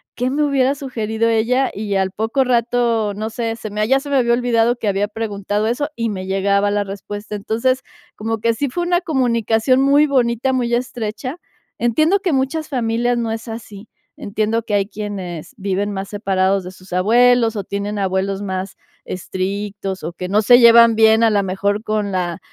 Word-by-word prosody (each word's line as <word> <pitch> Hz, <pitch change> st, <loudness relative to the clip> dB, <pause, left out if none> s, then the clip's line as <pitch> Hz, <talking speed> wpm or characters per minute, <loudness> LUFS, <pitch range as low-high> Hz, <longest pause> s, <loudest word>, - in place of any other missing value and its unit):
"¿Qué 250 Hz, +1 st, -1 dB
me 290 Hz, +3 st, 0 dB
hubiera 275 Hz, -2 st, +2 dB
sugerido 230 Hz, -4 st, -2 dB
ella?". 240 Hz, +4 st, +2 dB
Y 205 Hz, -1 st, -3 dB
al 190 Hz, -1 st, +1 dB
poco 225 Hz, +6 st, 0 dB
rato, 235 Hz, -3 st, +1 dB
no 215 Hz, +2 st, -3 dB
sé, 225 Hz, 0 st, -3 dB
se 220 Hz, -, -6 dB
me 210 Hz, +1 st, 0 dB
ya 270 Hz, +1 st, +3 dB
se 285 Hz, +1 st, -9 dB
me 280 Hz, -, +2 dB
había 235 Hz, -2 st, +3 dB
olvidado 240 Hz, -1 st, +2 dB
que 220 Hz, -, -4 dB
había 200 Hz, +1 st, 0 dB
preguntado 210 Hz, -1 st, -2 dB
eso 260 Hz, +6 st, -1 dB
y 230 Hz, -1 st, -1 dB
me 185 Hz, -2 st, -5 dB
llegaba 200 Hz, +1 st, +1 dB
la 205 Hz, 0 st, +1 dB
respuesta. 205 Hz, +2 st, -7 dB
Entonces, 230 Hz, +6 st, -1 dB, 0.3 s
como 225 Hz, +1 st, -3 dB
que 230 Hz, +2 st, +1 dB
sí 280 Hz, +5 st, -2 dB
fue 350 Hz, +8 st, -2 dB
una 350 Hz, 0 st, +1 dB
comunicación 250 Hz, -, +1 dB
muy 285 Hz, +2 st, +4 dB
bonita, 255 Hz, -1 st, +1 dB
muy 240 Hz, -2 st, 0 dB
estrecha. 245 Hz, +3 st, -4 dB, 0.4 s
Entiendo 310 Hz, -, +2 dB
que 375 Hz, -3 st, -1 dB
muchas 270 Hz, +4 st, -1 dB
familias 240 Hz, -2 st, 0 dB
no 230 Hz, -1 st, -2 dB
es 225 Hz, +1 st, -5 dB
así. 220 Hz, -2 st, -9 dB, 0.3 s
Entiendo 215 Hz, +3 st, -1 dB
que 210 Hz, -2 st, -5 dB
hay 200 Hz, -1 st, +1 dB
quienes 195 Hz, -6 st, -6 dB
viven 200 Hz, +1 st, -2 dB
más 195 Hz, 0 st, -5 dB
separados 195 Hz, -2 st, 0 dB
de 180 Hz, -, -7 dB
sus 185 Hz, 0 st, -17 dB
abuelos 230 Hz, +4 st, +4 dB
o 205 Hz, -, -3 dB
tienen 200 Hz, +2 st, -4 dB
abuelos 190 Hz, +1 st, -1 dB
más 190 Hz, -1 st, -4 dB, 0.3 s
estrictos 195 Hz, +1 st, -4 dB
o 170 Hz, -, -3 dB
que 180 Hz, +1 st, -6 dB
no 210 Hz, +2 st, +3 dB
se 245 Hz, +3 st, +7 dB
llevan 230 Hz, -1 st, +7 dB
bien 220 Hz, +1 st, +5 dB
a 225 Hz, -, +5 dB
la 205 Hz, -1 st, +2 dB
mejor 200 Hz, +2 st, -1 dB
con 215 Hz, -2 st, -1 dB
la 175 Hz, -2 st, -2 dB
220 Hz, 190 wpm, -19 LUFS, 200-245 Hz, 0.4 s, se